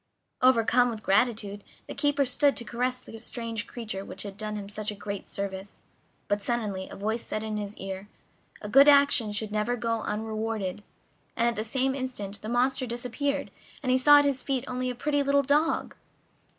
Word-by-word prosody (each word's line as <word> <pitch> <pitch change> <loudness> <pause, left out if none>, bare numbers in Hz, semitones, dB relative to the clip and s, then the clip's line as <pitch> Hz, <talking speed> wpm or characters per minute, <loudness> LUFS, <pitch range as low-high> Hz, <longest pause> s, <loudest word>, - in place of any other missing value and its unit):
Overcome 245 0 +4
with 220 -3 -6
gratitude, 205 -1 +1 0.2
the - - -5
keeper 290 -1 +2
stooped 280 +2 +2
to - - -2
caress 250 +3 -1
the 225 -3 -11
strange 230 -1 -5
creature 215 -5 -5
which - - -7
had 200 -1 -7
done 215 0 -4
him 205 -1 -5
such 210 +1 -3
a 210 - -4
great 200 -1 -6
service; 195 0 -6 0.4
but 205 0 0
suddenly 205 -4 -2
a - - -8
voice 220 +3 -2
said 215 - -4
in 215 -1 -3
his 205 0 -5
ear: 195 +1 -6 0.5
"A - - -4
good 275 +7 +7
action 280 -6 +6
should 210 0 -3
never 215 +3 0
go 230 -1 -1
unrewarded," 215 -2 -3 0.5
and 235 - +2
at 235 - +1
the 215 - -2
same 265 +4 0
instant 230 -7 -5
the 215 - -5
monster 255 +2 +1
disappeared, 250 +4 -2 0.3
and 255 - +1
he 255 - +5
saw 290 +3 +8
at 290 - +5
his 275 -2 +1
feet 270 -1 -1
only 255 0 -2
a 250 - -3
pretty 290 +3 0
little 280 0 +3
dog! 295 +4 +1
230 Hz, 190 wpm, -28 LUFS, 210-255 Hz, 0.5 s, saw